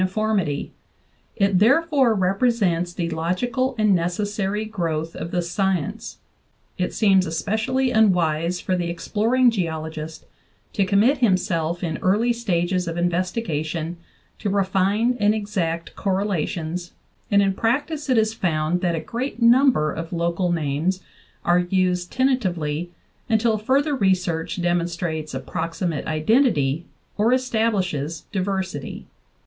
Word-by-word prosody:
VIII 185 - +2
formity; 200 -8 -1 0.7
it 195 -2 +2
therefore 270 +1 +4
represents 190 -3 +1
the 170 -1 -3
logical 245 +11 -1
and 215 -2 +3
necessary 200 +4 -1
growth 165 -6 -3
of 165 - -5
the 175 0 -1
science.... 180 -2 -2 0.6
It 180 - 0
seems 195 -4 +3
especially 220 +10 0
unwise 180 -5 +2
for 185 - -1
the 175 -1 -2
exploring 230 +8 +2
geologist 160 -5 -4 0.5
to 195 -2 +1
commit 220 +8 +3
himself 175 -6 +1
in 165 -2 -2
early 215 +6 +2
stages 180 -5 -1
of 165 0 -3
investigation 175 -2 -2 0.4
to 205 - -2
refined 200 +5 +1
and 210 +1 +3
exact 180 -6 -3
correlations, 180 -3 -2 0.4
and 200 - +4
in 195 -1 +1
practice 285 +8 -1
it 255 - +3
is 220 0 +2
found 170 -3 0
that 175 -3 +1
a - - -1
great 240 - -4
number 235 - +4
of 165 +1 -6
local 170 +1 0
names 165 +4 -1 0.4
are 175 +1 +4
used 180 0 0
tenta 260 0 +2
tively 170 -5 -2 0.4
until 220 -1 +2
further 275 +6 +1
research 185 -6 0
demonstrates 170 -3 -1
approximate 165 -1 -3
identity 155 - +2 0.3
or 220 +3 +3
establishes 205 - 0
diversity." 190 -7 -3
185 Hz, 120 wpm, -23 LUFS, 170-220 Hz, 0.7 s, therefore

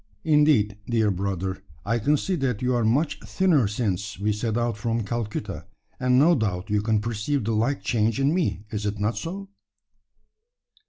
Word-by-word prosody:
Indeed, 150 - +3
dear 110 -3 +2
brother, 95 0 -3 0.2
I 115 +3 +1
can 145 +7 +2
see 190 - -2
that 125 -5 -1
you 125 0 +2
are 120 -1 +1
much 135 +8 +1
thinner 170 - +2
since 100 -2 -2
we 105 +2 0
set 110 +1 -2
out 120 -2 0
from 115 +1 -1
Calcutta; 105 -4 -4 0.3
and 125 0 +3
no 155 +6 +6
doubt 105 - -1
you 105 -1 +2
can 110 0 +1
perceive 115 +4 -1
the 115 - -1
like 120 +6 0
change 110 -1 +1
in 140 +3 +2
me. 170 - 0
Is 105 -1 -2
it 105 0 -2
not 105 +3 0
so?" 195 +4 -5
115 Hz, 175 wpm, -25 LUFS, 105-135 Hz, 0.3 s, no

